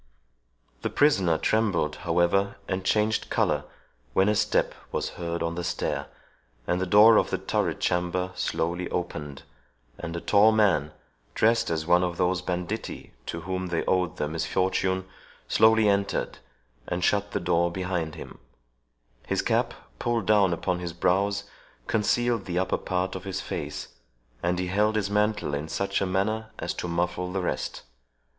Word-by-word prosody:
The - - -1
prisoner 95 - +3
trembled, 100 -7 +1
however, 85 +4 +1
and 95 0 -2
changed 105 +3 +1
colour, - - +1 0.5
when 95 +7 +4
a - - +3
step - - +1 0.2
was - - -1
heard 85 -1 -4
on 85 0 -1
the 90 +1 -4
stair, - - -2 0.6
and 90 +1 0
the 95 - -1
door 105 +4 +7
of - - +2
the - - 0
turret - - -1
chamber 90 +1 0
slowly 90 0 -2
opened, 75 -5 -4 0.6
and 85 0 -5
a - - -2
tall 105 +4 +5
man, 95 -9 +3 0.4
dressed 115 +1 +3
as 80 -1 -1
one 90 +1 +4
of 90 -1 -2
those 90 0 +1
banditti 90 +5 -4
to 85 - -4
whom 95 +1 -3
they 85 -2 -1
owed 90 -3 +1
their 75 - -1
misfortune, 95 +4 0 0.4
slowly 110 -1 +5
entered, 100 -1 0 0.5
and 90 +1 -2
shut 100 0 +2
the - - -1
door 85 -1 +1
behind 90 -3 -2
him; - - -10 0.9
his - - 0
cap, - - +1 0.2
pulled 120 -3 0
down 105 -3 +4
upon 90 +1 -1
his 85 -2 -5
brows, 100 +4 +1 0.4
concealed 115 0 +1
the 90 -1 -3
upper 95 - 0
part 90 0 -1
of 95 - -6
his 95 -1 -3
face, 95 - -5 0.5
and 90 +1 0
he 90 - -1
held 105 +4 +1
his 100 -2 0
mantle 105 -6 +1
in 75 +2 -3
such 100 +3 -1
a 95 - +1
manner 110 +4 -1
as - - -3
to - - -4
muffle 90 +1 -1
the 95 0 -1
rest. - - -3
95 Hz, 160 wpm, -26 LUFS, 85-100 Hz, 0.9 s, door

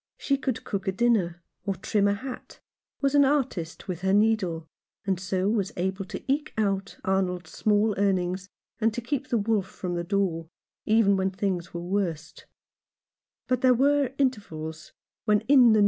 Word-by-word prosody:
She 275 - +1
could 260 -3 -2
cook 195 -1 -4
a - - +3
dinner, 190 -6 +1 0.2
or 195 -1 -1
trim 200 +3 +1
a 200 - +2
hat, 255 +5 -8 0.4
was 275 -1 +2
an 285 -1 +6
artist 265 - -1
with 180 -2 -4
her 190 0 +2
needle, 200 -7 +2 0.4
and 190 -2 0
so 185 +1 -1
was 205 -2 +1
able 190 +2 -1
to - - -7
eke 290 +3 0
out 195 -2 -1
Arnold's 180 -3 0
small 210 0 +2
earnings, 185 -1 0 0.3
and 225 0 +3
to 240 - -2
keep 270 +2 -2
the 240 - +1
wolf 210 -2 +1
from 180 -2 -5
the 170 0 -1
door, 175 -4 -1 0.4
even 215 -2 +4
when 190 0 +1
things 190 -2 -2
were 170 0 -5
worst; 175 -4 -3 1.0
but 255 -1 +1
there 255 -1 +5
were 280 +1 +3
intervals 160 - -2 0.3
when 210 -1 +3
In - - -17
the 225 - -27
41 265 -4 +8
Rough - - +6
Justice. - - +4
200 Hz, 180 wpm, -27 LUFS, 180-230 Hz, 1.0 s, 41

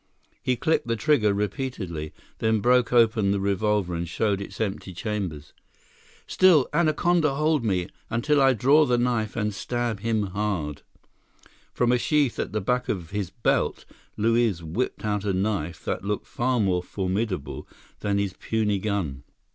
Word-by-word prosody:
He 125 - +1
clicked 160 0 0
the 115 - +1
trigger 115 -5 +3
repeatedly; 100 - -3 0.3
then 110 0 +2
broke 125 +2 +3
open 115 -4 +4
the 100 0 +1
revolver 100 -1 0
and 85 0 -3
showed 100 +1 0
its 100 - -8
empty 100 -4 -3
chambers. 95 -8 -4 0.7
"Still, 170 -8 +5
anaconda 160 -1 +2
hold 155 -2 +1
me, 95 -5 0 0.2
until 140 +5 +2
I 135 -1 +5
draw 140 +7 +5
knife 120 -3 0
and 105 -2 -1
stab 120 0 -2
him 110 0 0
hard!" 95 -8 -2 0.9
From 120 -1 +1
a 125 - +3
sheath 145 -3 +1
at - - -2
the 110 +1 -1
back 125 +5 -1
of 85 -5 -3
his 100 -3 -2
belt, 115 +3 0 0.3
Luiz 115 -5 +2
whipped 105 +9 -3
out 105 -2 -1
a 100 -2 0
knife 95 -4 -2
that - - -2
looked 105 +1 -2
far 125 0 0
more 95 -4 +2
formidable 95 -2 -3 0.3
than 100 -1 0
his 100 -2 -1
puny 105 -2 -1
gun. 95 -10 -2
105 Hz, 155 wpm, -25 LUFS, 95-125 Hz, 0.9 s, Still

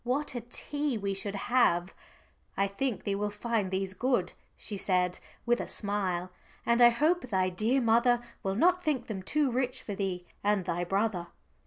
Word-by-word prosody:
What 270 +4 -1
a 245 - -3
tea 285 +3 -3
we 200 -1 -2
should 195 +1 -3
have! 195 -6 +2 0.6
"I 195 - +3
think 220 +4 -2
thee 200 - -1
will 205 +1 -1
find 210 -1 -1
these 190 0 -2
good," 200 -3 0 0.2
she 210 - -5
said 180 -2 +1 0.3
with 240 0 +2
a - - -5
smile, 185 -4 -2 0.3
"and 235 +1 +3
I 240 - +10
hope 300 +4 +1
thy 185 -3 +2
dear 220 +8 +2
mother 235 +1 +4 0.2
will 195 0 -1
not 360 - +4
think 290 -8 0
them 200 -4 -5
too 285 +7 +1
rich 255 +1 -1
for 205 - -4
thee 190 -3 -3 0.2
and 205 -2 +2
thy 175 -1 -1
brother." 195 -1 0
210 Hz, 180 wpm, -30 LUFS, 190-245 Hz, 0.6 s, I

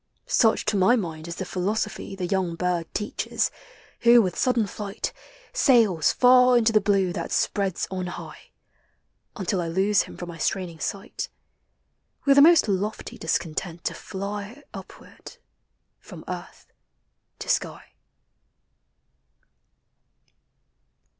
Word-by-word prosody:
Such, 225 -3 +2
to 215 - 0
my 195 +6 +5
mind, 165 -7 -4
is 170 - -5
the 190 - -5
philosophy 195 +2 -3
The 185 -2 -3
young 180 -2 -1
bird 175 -1 -2
teaches, 210 0 -2 0.5
who, 235 0 +7
with 185 -6 +1
sudden 245 -4 +2
flight, 200 0 -5 0.4
Sails 230 - +4
far 250 0 +6
into 225 -1 +3
the 215 - +5
blue 195 -3 +1
that - - -5
spreads 195 -3 0
on 185 -1 -3
high, 175 - -9 0.9
Until 190 -2 -1
I 170 - -3
lose 195 +4 +2
him - - -9
from 175 - -7
my 165 -1 -9
straining 175 -1 -2
sight,— 200 +7 -4 1.0
With 280 0 +6
a - - +9
most 325 -3 +6
lofty 205 +2 -3
discontent 165 +1 -3
to - - -1
fly 205 +7 -6
Upward, - - -12 0.6
from - - -12
earth - - -8 0.6
to - - -8
sky. - - -2
195 Hz, 125 wpm, -25 LUFS, 180-220 Hz, 1.0 s, a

